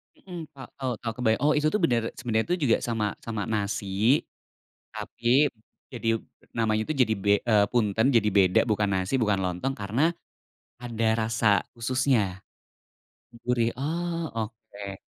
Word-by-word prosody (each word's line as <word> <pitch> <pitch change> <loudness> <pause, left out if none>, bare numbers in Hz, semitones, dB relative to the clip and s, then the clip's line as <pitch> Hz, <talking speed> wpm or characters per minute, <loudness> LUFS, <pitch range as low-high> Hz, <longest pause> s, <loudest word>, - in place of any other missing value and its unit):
Hmm 180 -3 -9 0.2
Kak, 130 -2 -9
tahu 130 -2 -1
tahu 115 -1 -2
kebay 110 -3 +3
oh 150 - +5
itu 150 - +2
tuh 210 +7 +1
benar, 120 -7 +3
sebenarnya 115 +8 0
juga 120 -5 +4
sama 115 -3 -1
sama 110 -3 -4
nasi, 105 +4 +1 0.7
tapi, 125 +5 +2 0.4
jadi 115 -2 -1 0.3
namanya 110 -2 +1
itu 155 - -2
jadi 110 -3 +1
be 100 +1 0
eee, 110 -5 +4
punten, 110 -2 +2
jadi 110 -3 +4
beda 95 -2 +5
bukan 105 -1 +1
nasi 95 +4 -1
bukan 105 -6 +1
lontong 90 +9 -1
karena, 105 +7 -1 0.8
ada 115 -2 -2 0.2
rasa 115 0 0 0.3
khususnya. 115 -6 0 1.0
Gurih. 120 -1 +2
Oh, 170 +4 -2
oke. 110 -3 -6
115 Hz, 140 wpm, -26 LUFS, 105-130 Hz, 1.0 s, oh